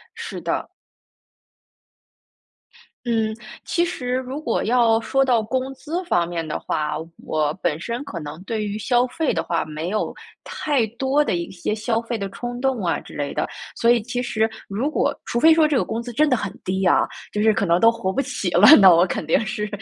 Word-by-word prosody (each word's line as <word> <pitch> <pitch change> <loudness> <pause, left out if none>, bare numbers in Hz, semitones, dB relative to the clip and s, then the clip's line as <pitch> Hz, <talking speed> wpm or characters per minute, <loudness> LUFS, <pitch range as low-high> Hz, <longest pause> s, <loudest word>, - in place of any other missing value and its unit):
是 - - -6
的。 - - -2 2.4
嗯， 225 -2 0 0.3
其 345 - +1
实 250 -8 -3
如 260 +3 -3
果 235 -7 -1
要 230 -1 +3
说 270 +4 +1
到 240 -4 +2
工 260 +4 -3
资 335 +7 -4
方 175 - +1
面 170 -2 -3
的 155 - -3
话， 150 -1 -2 0.3
我 150 -1 0
本 160 -3 0
身 235 +6 -4
可 170 - -6
能 150 +2 -8
对 220 0 -2
于 205 0 -3
消 245 +2 +2
费 320 +3 -1
的 165 - 0
话， 170 0 -1
没 155 +2 -5
有 215 +3 -2 0.3
太 275 -7 0
多 275 +3 +2
的 - - 0
一 170 -1 -3
些 185 +3 -3
消 225 +1 -1
费 235 +1 -4
的 200 -2 -4
冲 245 +3 -6
动 265 -3 0
啊 170 - 0
之 - - -13
类 145 -1 -3
的， - - -1 0.3
所 235 - +2
以 240 -1 +4
其 245 +2 -3
实 220 -2 0 0.2
如 220 +8 -1
果 310 - +1
除 235 - -2
非 320 +4 +7
说 320 -1 +5
这 300 -2 +1
个 - - +2
工 225 - -3
资 240 0 -7
真 300 +4 +2
的 255 - +4
很 200 -3 -4
低 190 +1 -1
啊， 180 - +4 0.3
就 210 - -1
是 220 - +5
可 200 -1 0
能 170 +1 +3
都 230 - +7
活 230 -5 -3
不 275 - 0
起 195 - -3
了， 180 +5 +6
那 190 -3 +8
我 170 +2 +5
肯 175 -3 -3
定 160 - +3
是 210 0 -3
225 Hz, 225 characters per minute, -22 LUFS, 185-255 Hz, 2.4 s, 那